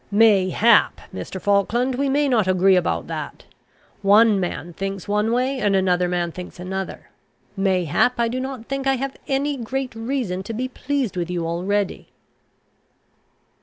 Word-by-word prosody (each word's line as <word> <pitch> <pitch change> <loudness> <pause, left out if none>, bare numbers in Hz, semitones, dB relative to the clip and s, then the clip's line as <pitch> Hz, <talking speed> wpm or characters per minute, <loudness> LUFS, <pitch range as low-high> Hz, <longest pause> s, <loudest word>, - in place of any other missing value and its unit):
"Mayhap, 210 +1 +4
Mr. 190 - -6
Falkland, 205 +7 +1
we 275 +2 0
may 290 +2 +2
not 225 -7 +2
agree 185 +1 +4
about 85 - 0
that. - - -6 0.6
One 205 +1 +5
man 175 -2 -4
thinks 195 +1 -5
one 210 +2 +1
way, 255 +3 0
and 205 -3 +2
another 180 -2 +2
man 175 -1 -1
thinks 180 +1 -9
another. 190 +1 -6 0.4
Mayhap 195 +5 +1
I 235 - +3
do 250 +3 -3
not 260 -3 -5
think 275 +1 -3
I 270 - +3
have 270 +1 -4
any 280 +1 0
great 255 +2 -4
reason 225 -5 -3
to 205 +4 -6
be 250 +4 -2
pleased 260 -3 -2
with 175 -1 -2
you 175 -2 -2
already." 185 +4 -2
205 Hz, 155 wpm, -22 LUFS, 185-255 Hz, 0.6 s, One